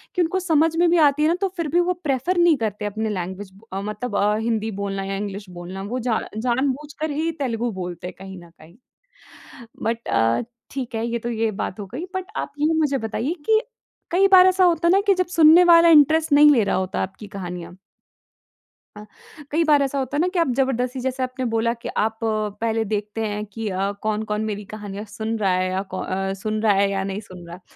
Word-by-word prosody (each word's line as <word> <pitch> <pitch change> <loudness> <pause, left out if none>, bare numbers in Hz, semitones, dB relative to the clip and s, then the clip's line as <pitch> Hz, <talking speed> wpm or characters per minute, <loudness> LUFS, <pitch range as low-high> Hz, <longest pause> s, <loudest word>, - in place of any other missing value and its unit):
कि 360 - +2
उनको 350 +3 0
समझ 325 -3 +2
में 345 0 +4
भी 345 - +3
आती 285 +2 -4
है - - +4
ना 335 - +2
तो 390 - +1
फ़िर 335 -2 -1
भी - - +6
वो - - +3
प्रेफ़र 285 +5 0
नहीं 345 -3 +5
करते 210 -3 -3
अपनी 215 +2 -2
लैंग्वेज 190 0 -5 0.2
मतलब 210 +3 -4
अ, 205 +1 +2
हिन्दी 225 -1 -1
बोलना 195 -1 -3
या 195 0 -3
इंग्लिश 200 -1 -6
बोलना 180 +2 -8
वो 235 +6 -3
जान 220 - 0 0.2
जान-बूझकर 280 +5 -1
ही 315 +3 -1
तेलुगु 240 -2 -1
बोलते 180 -3 -6
हैं - - -7
कहीं 190 0 -9
न 170 - -16
कहीं। 165 +1 -19 1.1
बट 230 +1 -2
अ, 115 - +2 0.3
ठीक 260 -3 -5
है 225 +1 -1
ये 235 0 -2
तो 235 - -5
ये 225 -1 0
बात 195 - -4
हो 200 - -6
गई। 255 - -6
बट 375 -1 -2
आप - - -3
ये 305 +2 +2
मुझे 295 -4 +1
बताइए 230 +7 -2
कि, 440 0 +4 0.5
कई 385 +3 +4
बार 375 -1 +8
ऐसा 375 0 +4
होता 340 -1 +3
है - - +5
ना 390 - +5
कि 400 - +5
जब 365 -1 0
सुनने 325 +2 +8
वाला 340 -1 +7
इंटरेस्ट 315 0 +5
नहीं 295 +1 +8
ले 235 -6 +3
रहा 200 - 0
होता 185 0 -2
आपकी 190 +3 -7
कहानियाँ 180 -2 -7 1.2
अ, 210 - -9 0.5
कई 325 +3 +2
बार 300 -3 +4
ऐसा 275 0 -1
होता 265 +2 -3
है - - +2
ना 355 - +2
कि 360 - +1
आप 335 -4 +2
जबरदस्ती 260 -1 0
जैसे 260 +1 -2
आपने 255 0 -3
बोला 230 0 0
कि - - -5
आप 220 +1 0
पहले 220 +1 -1
देखते 210 +1 -3
हैं 210 0 -3
कि 215 +2 -6
अ, 195 +1 -1
कौन-कौन 215 0 -2
मेरी 210 -1 -4
कहानियाँ 205 -1 -7
सुन 220 +2 -4
रहा 195 -3 +2
है 185 0 0
या 190 +1 -1
कौ 185 - -3
अ, 195 +1 -2
सुन 215 0 -2
रहा 215 -2 +4
है 200 0 +2
या 195 -1 -1
नहीं 195 +1 -4
सुन 185 -4 -12
रहा 170 - -8
है। 180 - -16
225 Hz, 225 wpm, -22 LUFS, 200-295 Hz, 1.2 s, बार